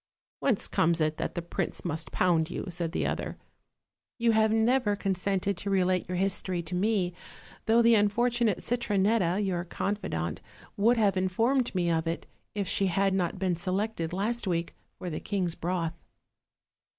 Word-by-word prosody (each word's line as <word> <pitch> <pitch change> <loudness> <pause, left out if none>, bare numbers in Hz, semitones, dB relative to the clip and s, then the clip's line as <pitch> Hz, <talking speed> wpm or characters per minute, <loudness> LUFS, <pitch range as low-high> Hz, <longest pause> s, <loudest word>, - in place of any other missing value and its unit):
"Whence 245 -8 +2
comes 170 0 +2
it 155 0 +1
that - - -3
the 175 - -3
prince 170 - -3
must 160 -1 -2
pound 170 -3 +2
you?" - - -4
said 170 -1 -2
the - - -1
other; - - -3 0.8
"you 235 -1 +3
have 220 0 +3
never 225 -1 +2
consented 195 0 -1
to 200 - -3
relate 185 -2 +1
your 180 - -2
history 185 -2 0
to 165 - -7
me, 185 -1 +1 0.5
though 230 +1 +5
the 230 0 +6
unfortunate 225 +1 +2
Citronetta, 205 -5 +1
your 175 -3 -1
confidante, 175 - -3 0.3
would 230 +4 +3
have 200 -4 +3
informed 230 +7 +1
me 175 -2 +1
of 165 0 0
it, 165 - -3 0.3
if 200 -2 -1
she 195 0 +1
had 195 +2 +2
not 185 -1 0
been 185 -2 0
selected 185 0 -2
last 215 +5 -1
week 170 -2 -1 0.2
for 180 - -7
the 155 - -3
king's 185 -4 -1
broth." 170 -1 -2
190 Hz, 165 wpm, -28 LUFS, 175-215 Hz, 0.8 s, the